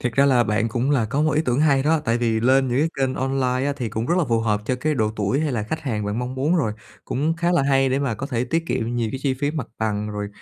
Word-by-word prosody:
thiệt 125 -1 -1
ra 140 +3 +4
là 125 -3 +4
bạn 110 +2 0
cũng 125 +5 -1
là 130 -6 +2
có 135 +7 -1
một 155 0 +2
ý 150 +2 +2
tưởng 125 +2 +1
hay 140 -3 +3
đó, 160 +3 +3
tại 115 +1 +1
vì 115 -2 +1
lên 130 +2 +3
những 125 +2 0
cái 155 - +2
kênh 130 -1 0
online 130 0 0
á, 145 - 0
thì 125 -4 -3
cũng 110 +2 -3
rất 175 - +2
là 170 - +2
phù 115 -1 +2
hợp 105 -2 0
cho 125 - 0
cái 150 +5 -1
độ 110 -5 +1
tuổi 105 +8 0
hay 155 -3 -1
là 110 -4 -1
khách 160 +10 -4
hàng 115 -8 -3
bạn 105 +3 -2
mong 125 +1 -3
muốn 150 +7 +1
rồi, 115 -10 0 0.3
cũng 155 +5 -1
khá 170 +1 +1
là 170 -6 +3
hay 135 -1 +3
để 130 +1 +1
mà 140 -5 -1
có 130 +6 -5
thể 125 -4 -1
tiết 165 +6 -1
kiệm 115 -4 -2
nhiều 115 -2 0
cái 135 - -3
chi 135 -2 +1
phí 145 +2 -1
mặt 150 -6 -4
bằng 105 -1 -1
rồi 105 -1 -4
130 Hz, 315 wpm, -22 LUFS, 115-140 Hz, 0.3 s, ra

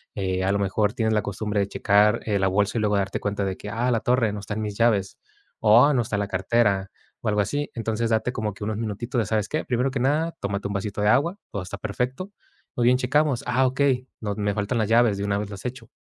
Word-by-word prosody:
eh, 95 -2 -1
a 95 - +2
lo 100 - +1
mejor 100 +2 +1
tienes 110 -2 0
la 105 - +2
costumbre 105 +1 -2
de 100 - 0
checar, 105 +3 +3
eh, 105 -2 +1
la 95 - +2
bolsa 100 +3 +1
y - - -1
luego 105 -1 +2
darte 100 0 -1
cuenta 100 0 -2
de 95 -1 -3
que, 105 - -8
ah, 120 +4 -1
la 115 - +2
torre 120 -3 +2
no 105 - -4
está 100 +1 -6
en 110 - -3
mis 105 -1 -4
llaves, 110 -5 +2 0.4
o 115 +6 +6
no 125 - +2
está 105 - -3
en - - 0
la 100 - -2
cartera, 100 0 +1 0.3
o - - -4
algo 105 -1 +2
así. 145 +8 -2
Entonces, 115 0 -2
date 110 +2 +1
como 110 -3 -2
que 100 - -9
unos 105 0 -2
minutitos 115 +3 -4
de, 110 - +1
¿sabes 105 0 -1
qué? 155 - -2
Primero 125 +2 0
que 135 - -2
nada, 150 +6 +1
tómate 100 0 -3
un 100 - -4
vasito 100 +1 -3
de 105 - +2
agua. 150 - +2
Todo 100 - -3
está 90 - -7
perfecto. 125 - -3 0.4
Muy 120 - 0
bien, 125 +1 +5
checamos: 140 +1 +1
"Ah, 125 +2 +2
okey. 130 -1 +1
No 105 -2 -2
me 105 0 -1
faltan 105 +4 -1
las 110 -2 0
llaves 115 -3 +4
de 100 - -3
una 100 0 0
vez 105 -1 -4
las 100 +2 -9
hecho". 120 -2 -6
110 Hz, 260 wpm, -24 LUFS, 100-125 Hz, 0.4 s, o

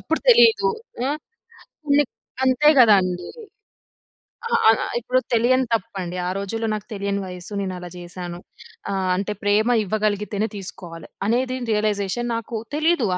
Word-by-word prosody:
అప్పుడు 325 - -1
తెలీదు. 470 -2 +6 0.4
ఆ! - - 0 0.8
హ్మ్. 285 0 +4 0.4
అంతే 260 +3 +4
గదా 225 -4 +8
అండీ. 180 -1 -3 1.2
ఆ! - - -9 0.2
ఆ! - - +9 0.3
ఇప్పుడు 250 +2 +1
తెలియని 250 +3 +3
తప్పండి. 190 -5 -3
ఆ - - 0
రోజుల్లో 225 +3 -3
నాకు 210 -1 -5
తెలియని 200 0 -2
వయసు. 180 +3 -8
నేను 190 -1 -3
అలా 180 0 -8
చేశాను. 175 0 -7 0.5
ఆహ్, 190 -1 -1
అంటే 200 +2 -2
ప్రేమ 210 +3 +3
ఇవ్వగలిగితేనే 210 +1 -1
తీసుకోవాలి. 175 -3 -9 0.2
అనేది 255 +3 0
రియలైజేషన్ 210 +2 0
నాకు 230 0 -4 0.2
తెలీదు 310 -5 +2
210 Hz, 130 wpm, -22 LUFS, 190-245 Hz, 1.2 s, ఆ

